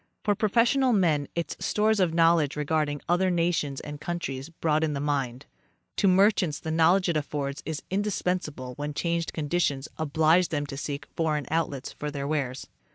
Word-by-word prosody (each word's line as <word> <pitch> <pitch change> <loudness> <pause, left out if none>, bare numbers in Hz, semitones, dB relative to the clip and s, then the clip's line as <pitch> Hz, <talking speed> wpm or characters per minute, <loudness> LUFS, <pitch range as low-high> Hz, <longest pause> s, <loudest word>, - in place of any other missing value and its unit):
For 205 - +3
professional 235 +5 +3
men 160 -8 +2
its 170 -3 -2
stores 215 0 +2
of 180 -3 +3
knowledge 165 -3 +3
regarding 150 -1 -1
other 180 +2 +2
nations 165 -5 0
and 150 0 -8
countries 150 -4 -4
broaden 155 -2 0
the 140 - -2
mind. 140 -3 -2 0.5
To 200 - +3
merchants 185 -4 +3
the 160 - -4
knowledge 170 +4 +4
it 170 - 0
affords 145 -1 -3
is 160 -2 -4
indispensable 180 -9 -2
when 145 0 -4
changed 170 0 -1
conditions 150 -3 -1
oblige 160 +3 +3
them 145 -2 -1
to 140 - -7
seek 145 0 -4
foreign 155 -3 0
outlets 145 -5 -1
for 150 - -5
their 140 -1 -4
wares. 140 -4 -2
155 Hz, 160 wpm, -27 LUFS, 145-175 Hz, 0.5 s, knowledge